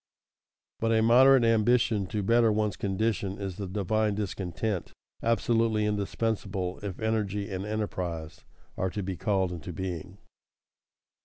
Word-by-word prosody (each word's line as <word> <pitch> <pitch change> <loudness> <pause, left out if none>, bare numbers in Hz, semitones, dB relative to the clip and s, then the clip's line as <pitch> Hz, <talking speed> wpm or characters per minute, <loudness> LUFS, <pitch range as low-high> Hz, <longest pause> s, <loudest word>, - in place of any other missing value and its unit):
But 115 0 +1
a 110 0 +3
moderate 130 +3 +6
ambition 115 -2 +3
to 105 +1 -2
better 115 +2 +4
one's 105 -2 0
condition 100 -1 -1
is 95 -3 -5
the 100 -2 -4
"divine 105 +2 0
discontent" 100 -1 -3 0.3
absolutely 115 -1 +2
indispensable 100 -3 -2
if 100 -3 -5
energy 105 -2 -1
and 95 +2 -4
enterprise 90 -6 -4 0.3
are 95 - 0
to 100 +2 -4
be 95 0 -3
called 95 0 0
into 90 +1 -6
being. 90 +1 -5
105 Hz, 130 wpm, -28 LUFS, 95-110 Hz, 0.3 s, moderate